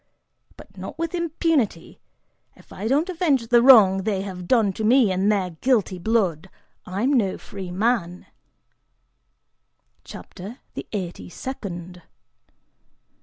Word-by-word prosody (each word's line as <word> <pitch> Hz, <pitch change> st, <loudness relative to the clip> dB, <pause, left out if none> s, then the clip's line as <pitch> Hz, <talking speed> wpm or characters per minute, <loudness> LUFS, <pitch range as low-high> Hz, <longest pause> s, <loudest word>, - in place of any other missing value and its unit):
But -, -, -15 dB
not -, -, -8 dB
with 335 Hz, 0 st, -3 dB
impunity! 325 Hz, -, -1 dB, 0.6 s
If -, -, -17 dB
I 205 Hz, -, -4 dB
don't 290 Hz, +8 st, +2 dB
avenge 315 Hz, -10 st, 0 dB
the 240 Hz, -1 st, +5 dB
wrong 215 Hz, -7 st, +7 dB
they 195 Hz, -1 st, -2 dB
have 180 Hz, -3 st, -7 dB
done 220 Hz, -5 st, +3 dB
me 225 Hz, 0 st, +4 dB
in 190 Hz, +2 st, +1 dB
their 195 Hz, -4 st, 0 dB
guilty 200 Hz, 0 st, 0 dB
blood, 190 Hz, -5 st, 0 dB, 0.4 s
I'm 205 Hz, +10 st, 0 dB
no 205 Hz, -8 st, +1 dB
free 190 Hz, -2 st, -9 dB
man!" 185 Hz, -2 st, -1 dB, 1.8 s
CHAPTER 200 Hz, +7 st, -10 dB, 0.2 s
THE -, -, -7 dB
EIGHTY 185 Hz, -5 st, -5 dB
SECOND. 180 Hz, -7 st, -7 dB
210 Hz, 120 wpm, -23 LUFS, 185-255 Hz, 1.8 s, wrong